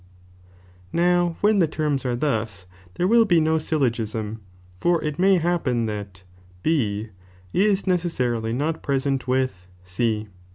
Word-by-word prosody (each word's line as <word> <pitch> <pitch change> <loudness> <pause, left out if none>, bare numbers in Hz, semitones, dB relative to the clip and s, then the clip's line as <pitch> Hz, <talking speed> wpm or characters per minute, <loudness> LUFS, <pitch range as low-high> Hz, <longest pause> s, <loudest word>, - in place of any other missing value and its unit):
now 175 -1 +2
when 210 0 +4
the 170 - +4
terms 150 -3 -1
are 120 - 0
thus, 110 -8 -2 0.3
there 180 - +1
will 230 +2 +6
be 175 -6 +3
no 160 0 +2
syl 155 -1 -1
logisin, 110 -3 -1 0.4
for 175 -1 +2
it 150 0 -3
may 195 +1 +5
happen 160 -9 0
that 100 -3 -6 0.4
B 110 -9 0 0.4
is 200 0 +2
necessarily 125 - 0
not 150 +7 -1
present 135 -1 -1
with 130 -8 -1 0.2
C. 105 +3 -1
140 Hz, 135 wpm, -23 LUFS, 115-170 Hz, 0.4 s, will